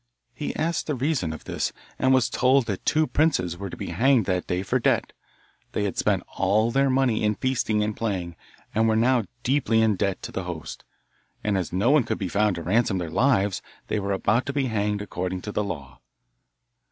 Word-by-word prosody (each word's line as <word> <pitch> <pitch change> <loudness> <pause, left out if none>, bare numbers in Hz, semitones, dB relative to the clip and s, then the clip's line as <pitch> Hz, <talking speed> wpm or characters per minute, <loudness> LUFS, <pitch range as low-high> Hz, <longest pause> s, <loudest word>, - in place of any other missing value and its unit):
He 145 +3 -4
asked 165 +2 -1
the 150 - 0
reason 130 - 0
of 80 - -8
this, - - -2 0.3
and 130 - +3
was 130 -2 +4
told 130 0 +3
that 100 -4 -4
two 155 0 +3
princes 140 - +1
were 100 +2 -6
to - - -8
be - - -5
hanged 130 -3 +3
that 90 -1 -1
day 90 +1 -1
for 95 - 0
debt; - - +1 0.6
they - - 0
had 100 - -2
spent - - +1
all 105 +4 +2
their 135 +2 +3
money 130 -4 +2
in 105 0 +2
feasting 110 -4 0
and 105 0 -2
playing, 95 -6 -3 0.4
and 110 +1 +3
were 110 - +3
now 120 0 +3 0.2
deeply 125 -4 +2
in 110 -2 +3
debt 100 -1 0
to - - -6
the 95 - -4
host, 85 -4 -7 0.6
and 105 -1 +1
as 95 -3 -2
no 100 +8 +2
one 150 -3 +5
could - - -2
be 95 - -3
found 105 +1 +2
to 85 - -5
ransom 100 +3 +2
their 85 -3 -4
lives 100 -5 +2 0.3
they 105 - 0
were 100 0 -2
about 115 +6 +1
to 140 - -2
be 140 -1 +1
hanged 105 -3 -1
according 90 -2 -4
to 105 - -4
the 105 - -1
law. 70 -10 -6
105 Hz, 215 wpm, -25 LUFS, 95-130 Hz, 0.6 s, one